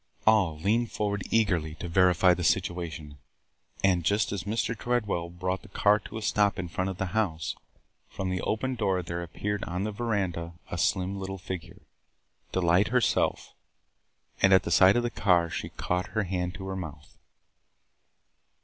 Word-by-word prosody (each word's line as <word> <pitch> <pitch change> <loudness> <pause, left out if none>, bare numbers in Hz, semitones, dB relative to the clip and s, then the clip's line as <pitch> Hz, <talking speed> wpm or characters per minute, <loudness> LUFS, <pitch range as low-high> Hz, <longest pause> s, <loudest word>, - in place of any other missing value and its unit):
All 100 -8 +4
leaned 110 +8 +1
forward 100 -1 -1
eagerly 90 -9 +1
to 85 - -6
verify 90 +1 +4
the 90 0 -3
situation, 80 -3 -1 0.6
and, 90 -3 +3
just 100 +5 +1
as 100 -3 -3
Mr. 110 +2 -1
Tredwell 105 -8 -1
brought 90 +2 -3
the - - -14
car 105 +2 +3
to 110 - -8
a 110 - -5
stop 105 -1 +2
in 90 -1 -4
front 95 +3 -2
of 95 - -5
the 95 0 -3
house, 80 -9 -1 0.5
from 95 -1 -3
the 90 - -1
open 130 +5 -1
door 95 -6 0
there 85 +1 -4
appeared 100 +4 -3
on 90 +2 -3
the 105 - -2
veranda 100 -7 -2 0.2
a 85 - -2
slim 95 +1 0
little 95 0 -5
figure 90 -2 -7 0.4
– - - -42
Delight 90 +2 +3
herself 125 0 +1 0.4
– - - -29
and 95 0 +6
at 95 -1 +5
sight 95 +3 +7
of 120 - +2
the 120 - -1
car, 85 -6 +2
she - - -4
caught 90 +1 -2
her 110 - +3
hand 90 -1 -2
to 95 +1 -7
her 95 0 -4
mouth! 80 -5 -8
95 Hz, 175 wpm, -28 LUFS, 85-105 Hz, 0.6 s, sight